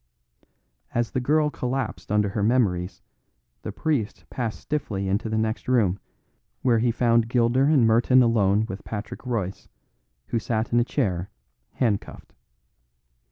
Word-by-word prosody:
As 120 -1 0
the - - -1
girl 150 +4 +2
collapsed 130 -5 -4
under 105 -1 +2
her 100 +2 -2
memories, 100 -6 +1 0.6
the - - -5
priest 135 -10 -2
passed 115 -4 -3
stiffly 110 -10 -3
into 100 +4 -1
the 110 - -1
next 110 +1 -2
room, 110 -7 +2 0.6
where 120 -3 +3
he 120 +2 +2
found 115 -1 +2
Gilder 120 +2 +3
and 145 -5 +4
Merton 120 +3 +5
alone 105 -2 +2
with 100 -3 -7
Patrick 105 -1 -6
Royce, 100 -6 -3 0.6
who 115 - 0
sat 110 +1 -2
in 120 - +5
a - - +4
chair, 95 - -1 0.4
handcuffed. 110 -6 -2
115 Hz, 140 wpm, -25 LUFS, 105-125 Hz, 0.6 s, Merton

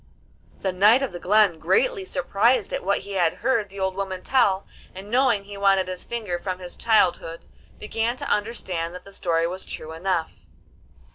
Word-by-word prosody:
The 190 - 0
Knight 210 +8 +5
of 270 - -2
the 175 - -7
Glen, 200 -3 +3
greatly 455 - +1
surprised 240 - +1
at - - -2
what 200 +2 +1
he 200 - -10
had 175 -4 +1
heard 230 -6 0
the 195 +1 -10
old 190 0 0
woman 190 -1 -4
tell, 200 -7 +2 0.3
and 195 +3 -9
knowing 245 -5 +3
he 200 0 -10
wanted 195 -1 +3
his 185 -1 -5
finger 215 -7 -3
from 185 0 -3
his 180 -1 -8
childhood, 180 -7 +1 0.4
began 225 +3 -2
to - - -6
understand 185 -6 -2
that 180 - -10
the 200 - -13
story 165 -3 0
was 185 +3 -4
true 155 - -7
enough. 170 0 -2
195 Hz, 185 wpm, -24 LUFS, 180-225 Hz, 0.4 s, Knight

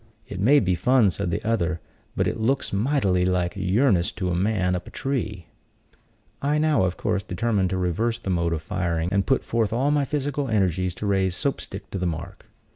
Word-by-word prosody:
"It 95 - -6
may 135 +9 +5
be 95 -6 +1
fun," 110 +4 +3
said 85 - -3
the 85 - -3
other, 90 -7 0 0.4
"but - - +1
it - - -2
looks 125 +2 0
mightily 100 -5 +2
like 90 -1 +1
yearnest 95 0 +2
to 90 -2 -1
a - - 0
man 95 -1 +1
up 90 - -5
a - - -7
tree." 110 - -3 1.0
I 145 +2 +1
now, 150 -9 +3
of 90 - -2
course, 105 -2 0
determined 100 0 0
to 95 - -1
reverse 100 +6 0
the 100 -5 -4
mode 85 -1 +1
of 80 -1 -3
firing, 85 -3 -1
and 100 -1 +1
put 135 - +2
forth 115 -3 0
all 130 +6 +1
my 145 -1 +2
physical 145 -1 -2
energies 95 -4 +1
to - - -5
raise 95 -2 +1
Soap 140 +6 -1
stick 100 +1 -9
to 95 - -3
the 90 - 0
mark. 85 +5 -6
100 Hz, 205 wpm, -24 LUFS, 90-120 Hz, 1.0 s, may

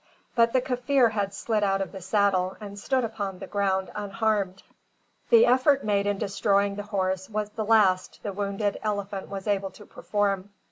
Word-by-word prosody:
But 230 0 +4
the 255 - +2
Kaffir 250 -1 +2
had 200 -2 -1
slid 210 +1 -1
out 195 -1 +2
of 195 - -3
the 190 - -8
saddle 190 -1 +1
and 205 -1 -8
stood 260 +4 0
upon 205 -4 -4
the - - -7
ground 190 -2 -1
unharmed. 205 -2 -1 0.7
The 230 0 +7
effort 260 +3 +3
made 205 -1 +1
in 205 -1 0
destroying 200 -1 +1
the 205 - -4
horse 190 -2 -2
was 210 -1 -3
the 220 +1 -3
last 205 -4 +3
the 205 - -3
wounded 200 +1 -2
elephant 200 -2 -3
was 195 -1 -6
able 200 -2 0
to 210 - -15
perform. 200 -2 -2
205 Hz, 180 wpm, -26 LUFS, 195-220 Hz, 0.7 s, The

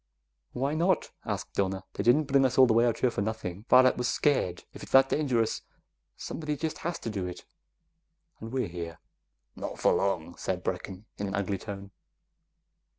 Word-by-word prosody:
"Why 135 +4 -1
not?" 170 +2 +1
asked - - -4
Donna. 95 -1 -1
"They - - -3
didn't 120 +8 +5
bring 140 -1 +3
us 130 -1 +1
all 130 - +9
the 120 - +3
way 115 +2 +4
out 115 - 0
here 125 - +2
for 100 - -2
nothing. 105 -2 -4
Varret 130 0 +6
was 125 - 0
scared. 125 -10 +1
If - - -10
it's - - -10
that 135 0 +7
dangerous, 125 -7 +1 0.6
somebody 150 -2 -4
just 155 +2 -3
has 170 0 -3
to - - -3
do 95 -3 -3
it 90 - -8 0.9
and 110 +1 -7
we're 130 -1 0
here!" 85 -1 -6 0.6
"Not - - -5
for - - +3
long," 85 -4 -1
said 90 -1 -3
Brecken 95 +2 -4
in 100 - -2
an 95 - -3
ugly 100 -1 -1
tone. 100 -2 -7
115 Hz, 185 wpm, -29 LUFS, 95-135 Hz, 0.9 s, all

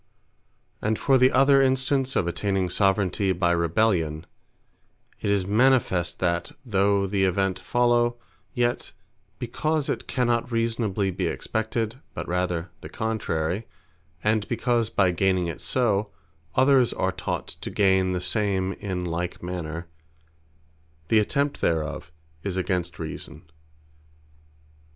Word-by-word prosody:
And 110 +1 0
for 135 -2 +3
the 130 +1 +5
other 135 +1 +5
Instance 135 0 +1
of - - +2
attaining 95 +1 -1
Soveraignty 95 0 +2
by 85 -1 +2
Rebellion; 85 -2 +1 0.9
it - - -2
is 100 -2 +2
manifest, 105 -5 +2
that 85 -1 -1
though 100 -2 +2
the 95 0 0
event 95 0 +1
follow, 120 -1 +2 0.3
yet 120 0 -1 0.4
because 150 +5 -1
it - - -3
cannot 120 -1 0
reasonably 115 -4 0
be - - -2
expected, 110 +2 -2 0.2
but - - -5
rather 90 -1 -1
the - - -8
contrary; 105 -3 -2 0.6
and 105 0 +1
because 120 -1 0
by 95 -4 +2
gaining 95 0 +1
it 85 0 -5
so, 105 +2 +1 0.5
others 130 -2 +4
are - - 0
taught - - -4
to - - -4
gain 95 -2 +3
the 90 - -1
same 95 0 0
in 95 -3 -4
like 85 +1 -3
manner, 85 -2 -5 1.2
the 110 - +5
attempt 140 +6 0
thereof 80 -2 -1 0.3
is 95 0 -3
against 90 -3 -1
reason. 80 -2 -7
100 Hz, 125 wpm, -25 LUFS, 90-120 Hz, 1.2 s, the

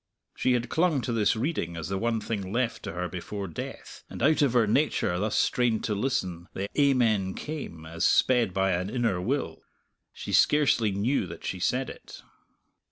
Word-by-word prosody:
She 130 - +2
had 120 0 0
clung 160 -4 +1
to 120 - -2
this 110 -1 +2
reading 110 - -2
as 80 - -4
the 95 - -1
one 115 0 0
thing 100 -3 -4
left 120 +1 -1
to - - -5
her 90 +1 -3
before 95 +3 -5
death, 85 - -8
and - - -6
out 155 +3 +4
of 140 -4 +3
her 120 -3 +4
nature 105 - +1
thus 105 +2 0
strained 120 -3 +1
to 105 - -1
listen 95 -7 -2
the 100 +1 -2
"Amen" 115 -9 +2
came, 135 - -6
as 80 +1 -4
sped 120 -6 +3
by 95 +1 +1
an 90 +2 -1
inner 115 -6 0
will. - - -2 0.5
She - - -7
scarcely 135 -7 +4
knew 100 +2 0
that 85 - -9
she 95 - -3
said 130 +8 0
it. - - -11
110 Hz, 185 wpm, -27 LUFS, 95-125 Hz, 0.5 s, out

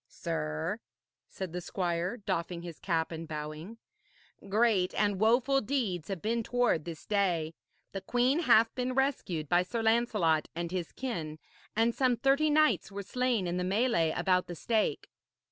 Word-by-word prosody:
'Sir,' 75 0 -3 0.5
said 185 -3 -6
the 180 - -3
squire, 175 +3 -2
doffing 175 -4 -3
his 170 -2 -8
cap 165 -3 -1
and 165 0 -6
bowing, 155 +7 -6 0.7
'great 205 -3 +2
and 205 -2 +1
woful 250 +5 +3
deeds 210 - -2
have 195 -4 -5
been 230 +2 0
toward 240 -9 +1
this 165 -2 -8
day. 175 -6 0 0.4
The 195 - -5
queen 250 - +2
hath 235 -8 +4
been 255 0 -2
rescued 245 - 0
by 175 +4 +4
Sir 225 +5 -3
Lancelot 220 -9 +2
and 170 0 -3
his 180 -3 -3
kin, 165 -13 -4 0.4
and 225 +2 +3
some 255 -2 +2
thirty 275 +5 +3
knights 305 -7 +3
were 200 0 -5
slain 245 -1 0
in 175 0 -2
the 180 - -1
melée 190 -4 +2
about 180 -1 +2
the 175 - -6
stake.' 220 +6 0
195 Hz, 160 wpm, -30 LUFS, 170-240 Hz, 0.7 s, hath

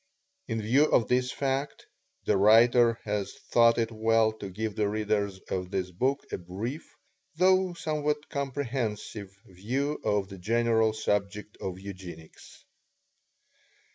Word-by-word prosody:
In 115 - -2
view 130 +8 +4
of 115 -7 +2
this 125 0 +1
fact, 135 +1 -2 0.4
the - - +2
writer 115 +3 +5
has 105 -2 -3 0.2
thought 115 0 +5
it 115 -1 0
well 110 0 +2
to 100 - -6
give 105 +3 -4
the 105 -1 +1
readers 105 -2 -1
of 90 -1 -2
this 90 -1 -3
book 130 +10 -1
a - - -3
brief, 105 - -6 0.4
though 185 +1 +3
somewhat 150 -2 -2
comprehensive, 120 -7 -3 0.2
view 130 +11 -3
of 105 -2 0
the 95 -1 -10
general 110 +2 +2
subject 105 -1 -2
of 95 -1 -5
Eugenics. 90 -5 -11
110 Hz, 130 wpm, -28 LUFS, 100-130 Hz, 0.4 s, writer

